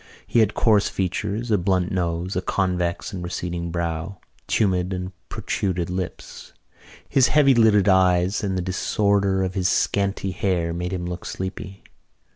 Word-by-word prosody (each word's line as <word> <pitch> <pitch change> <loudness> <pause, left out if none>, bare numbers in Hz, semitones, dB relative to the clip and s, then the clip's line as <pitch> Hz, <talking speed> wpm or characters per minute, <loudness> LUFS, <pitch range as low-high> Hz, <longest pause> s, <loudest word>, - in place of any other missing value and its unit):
He - - +1
had 110 -2 +2
coarse 105 -3 +3
features, 100 +5 -2
a 105 - +3
blunt 90 0 0
nose, 90 0 -2
a 90 - 0
convex 90 +1 -1
and 90 -2 -5
receding 85 -1 -4
brow, 85 +2 -3 0.3
tumid 95 -3 +1
and 90 0 -4 0.2
protruded 90 -3 -2
lips. 90 -1 -6 0.5
His 130 -2 +4
heavy 145 -3 +5
lidded 110 -4 +4
eyes 95 +1 +3
and 95 -2 -1
the 90 - -1
disorder 100 +1 +1
of 95 0 -2
his 95 -1 +1
scanty 100 -1 0
hair 90 -3 -1
made 90 +1 -3
him 90 -2 -3
look 90 0 -5
sleepy. 95 +1 -6
95 Hz, 150 wpm, -23 LUFS, 90-100 Hz, 0.5 s, heavy